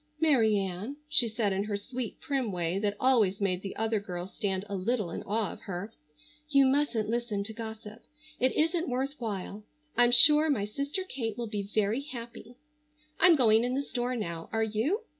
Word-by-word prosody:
"Mary 240 -10 +4
Ann," 195 +8 -4
she 255 -5 +4
said 220 -3 0
in 195 +2 -1
her 205 -1 -2
sweet, 245 +2 -6
prim 265 -6 -2
way 175 +1 -1
that 205 0 -1
always 225 -7 +3
made 185 -3 0
the 195 - -6
other 225 0 0
girl 180 -3 -6
stand 190 0 -3
a 200 - -4
little 205 -1 -1
in - - -5
awe 215 +1 -1
of - - -13
her, 200 +2 -6 0.6
"you 275 -2 +5
mustn't 260 -5 +1
listen 230 -3 -1
to 220 +2 -6
gossip. 220 0 -8 0.4
It 255 +1 +3
isn't 330 +1 +1
worth 265 +3 -1
while. 210 -2 -5 0.3
I'm 240 0 +5
sure 300 +5 +7
my 215 -9 +1
sister 280 - -3
Kate 230 - -4
will 240 - -2
be 200 -2 -4
very 215 +4 +1
happy. 240 -3 -9 0.6
I'm 350 -1 +7
going 225 -5 +4
in 250 +1 -1
the 280 - 0
store 250 -2 -2
now, 170 -7 -5
are 225 0 +1
you?" 230 - 0
225 Hz, 190 wpm, -29 LUFS, 200-255 Hz, 0.6 s, sure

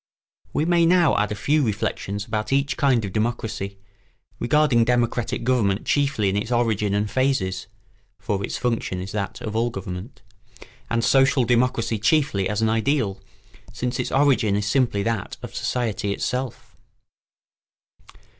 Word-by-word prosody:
We 155 - 0
may 170 -1 +3
now 175 -4 +4
add 105 0 +1
a - - -1
few 150 +9 +1
reflections 105 -3 -2
about 110 0 -3
each 140 -1 +1
kind 125 -6 +2
of 95 - -6
democracy, 110 -3 -2 0.6
regarding 140 -3 +3
democratic 120 0 0
government 115 -5 +1
chiefly 140 -8 +1
in 95 - 0
its 105 +4 -2
origin 110 -4 +1
and 105 +1 0
phases 105 -7 0 0.5
(for 100 +1 -2
its - - -3
function 115 -6 -1
is 95 +2 -6
that 100 -2 -4
of 110 0 -5
all 115 +2 +1
government) 95 +2 -7 0.7
and 115 0 0
social 135 +1 +4
democracy 120 -2 +1
chiefly 115 -6 +2
as 105 +1 -1
an - - +3
ideal, 110 -4 0 0.5
since 125 +1 -3
its 125 - -2
origin 130 -7 +3
is 105 0 -1
simply 115 -4 +1
that 115 -2 -2
of - - -7
society 110 -5 -2
itself. 125 +4 -4
115 Hz, 145 wpm, -23 LUFS, 100-130 Hz, 0.7 s, now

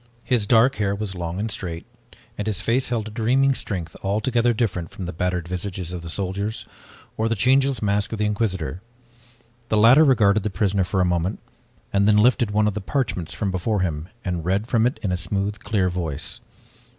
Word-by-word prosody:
His 115 -5 +2
dark 125 +4 +4
hair 100 -1 0
was 100 -1 -3
long 85 0 -4
and 110 +1 -2
straight, 85 -4 -5 0.5
and 105 -1 -4
his 105 -4 0
face 125 +3 +1
held 115 -3 -1
a - - -8
dreaming 130 +5 +2
strength, 90 -9 -4
altogether 115 +4 +1
different 100 -8 -1
from 95 - -7
the 90 - -5
battered 90 0 -2
visages 90 -1 -4
of 90 - -5
the 85 - -7
soldiers 100 +4 -3 0.5
or 110 +1 +1
the 115 - +1
changeless 130 +3 +2
mask 100 0 +1
of 110 - -3
the 105 - 0
Inquisitor. 95 -5 -1 0.9
The 110 - +2
latter 120 +8 +7
regarded 110 -7 +4
the 105 - -2
prisoner 95 0 +1
for 95 +1 0
a - - +3
moment, 90 +2 0 0.6
and 100 0 +3
then 105 -1 +5
lifted 120 +1 +4
one 105 +1 +2
of 105 - 0
the 105 - -4
parchments 95 - -2
from 95 +2 -1
before 95 +3 -1
him 80 -1 -2 0.2
and 90 -3 -2
read 95 +5 0
from 115 -1 +2
it 125 - -3
in 100 - 0
a 90 - 0
smooth, 100 +3 -2
clear 105 -3 0
voice. 85 -5 -3
100 Hz, 200 wpm, -23 LUFS, 90-110 Hz, 0.9 s, latter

